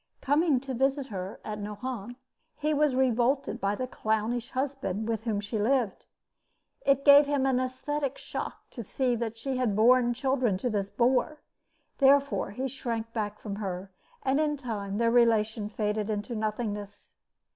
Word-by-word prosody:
Coming 290 0 +2
to 270 -1 -5
visit 270 +2 +1
her 190 0 -5
at 210 -1 -4
Nohant, 210 +2 -5 0.4
he 305 +1 0
was 295 -2 +2
revolted 260 +1 +1
by 200 +1 +1
the 255 - -3
clownish 225 0 -1
husband 260 -6 -2
with 225 0 -2
whom 215 -3 0
she 210 +2 -3
lived. 230 -2 0 0.8
It 275 0 +2
gave 285 0 +8
him 285 -2 +1
an 260 -2 +2
esthetic 275 +2 -2
shock - - -6
to 240 - -6
see 245 +3 0
that 230 -1 -3
she 260 +3 -3
had 245 -6 +1
borne 240 +2 +4
children 255 -5 +1
to 245 +5 -2
this 200 -2 -1
boor. 255 +6 +1 0.6
Therefore 280 -2 +4
he 255 +7 -3
shrank 230 -3 -4
back 210 -2 -3
from 205 -2 -5
her, 190 -2 -5 0.3
and 270 +2 +2
in 300 -1 +1
time 205 -6 -4
their 230 0 +2
relation 220 -3 +3
faded 210 0 -2
into 215 +3 -3
nothingness. 210 -2 -4
240 Hz, 160 wpm, -28 LUFS, 210-265 Hz, 0.8 s, gave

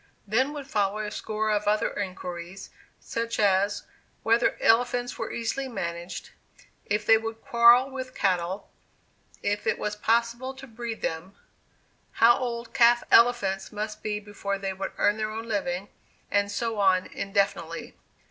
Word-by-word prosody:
Then 250 +7 +1
would 290 -2 -6
follow 205 -5 0
a 210 -1 -4
score 215 0 -2
of 210 0 0
other 210 +1 +2
inquiries, 180 -2 -6 0.3
such 230 0 -3
as, 200 0 +2 0.4
whether 230 +1 +3
elephants 245 +1 +2
were - - -3
easily 250 +4 -2
managed; 170 -7 -5 0.6
if 210 0 0
they 225 0 +6
would 225 0 -5
quarrel 235 +2 +6
with 260 -1 -6
cattle; 185 0 -1 0.7
if 205 0 -1
it - - +2
was 210 0 -3
possible 235 +4 0
to 270 0 -10
breed 230 -2 -6
them; 165 +4 -4 0.8
how 235 +1 +6
old 235 -2 -4
calf 240 0 +5
elephants 200 -5 +4
must 210 0 -5
be 210 -1 -2
before 205 -1 -4
they 195 -1 -3
would 190 +1 -5
earn 205 +1 +2
their 215 0 -2
own 225 +1 -6
living; 195 -3 -2 0.4
and 205 0 +1
so 220 +1 -2
on 190 -2 +3
indefinitely. 200 0 -2
215 Hz, 145 wpm, -27 LUFS, 200-235 Hz, 0.8 s, they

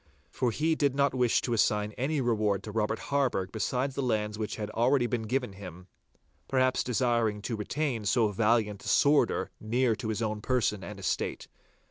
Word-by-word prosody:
For 125 - 0
he 155 +8 +1
did 140 -4 +1
not 140 -1 +2
wish 125 -3 +2
to 120 - -2
assign 105 -1 +1
any 135 +6 -1
reward 105 -5 +1
to 105 - -7
Robert 110 +1 0 0.2
Harburgh 125 -10 +1
besides 125 +4 -1
the 140 - -2
lands 105 -4 -1
which 105 0 -4
had 105 -1 -5
already 125 +2 +2
been 115 -2 -2
given 125 -3 -1
him, 90 -2 -10 0.6
perhaps 130 -1 +2
desiring 115 -3 +1
to 115 - -2
retain 115 +1 -2
so 110 +1 +3
valiant 105 -1 +1
a - - -8
sworder 145 +1 +3
near 120 +1 +1
to 120 - -5
his 110 +1 -1
own 110 -1 -2
person 110 -5 0
and 100 +3 -8
estate. 95 - -2
115 Hz, 180 wpm, -29 LUFS, 105-130 Hz, 0.6 s, so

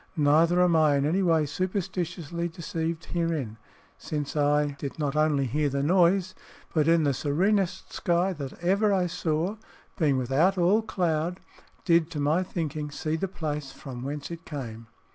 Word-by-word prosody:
Neither 160 +4 +4
am 175 -2 +3
I 155 -2 +4
in 140 0 +1
any 175 +6 +1
way 165 -4 +3
superstitiously 175 -1 -3
deceived 165 -2 -4
herein, 160 -11 -2 0.4
since 150 -1 -4
I 145 0 +2
did 140 - -5
not 145 -2 -1
only 155 -3 +2
hear 145 +4 0
the 140 0 -1
noise, 185 +3 +3 0.4
but 155 -2 +2
in 165 -1 +4
the 140 -2 +2
serenest 180 +8 0
sky 175 +2 +1
that 140 -5 -6
ever 200 +4 +3
I 190 -2 +2
saw 170 +3 -1 0.4
being 145 -5 +3
without 140 +10 +2
all 185 +5 +4
cloud 175 -4 -1 0.5
did, 170 -2 +3
to 160 -3 -5
my 150 +5 +2
thinking, 155 -5 -3
see 155 +2 -3
the 180 +4 -2
place 150 -6 -4
from 130 -4 -9
whence 145 +4 -5
it 165 -1 -7
came." 115 -8 -7
160 Hz, 160 wpm, -27 LUFS, 145-175 Hz, 0.5 s, Neither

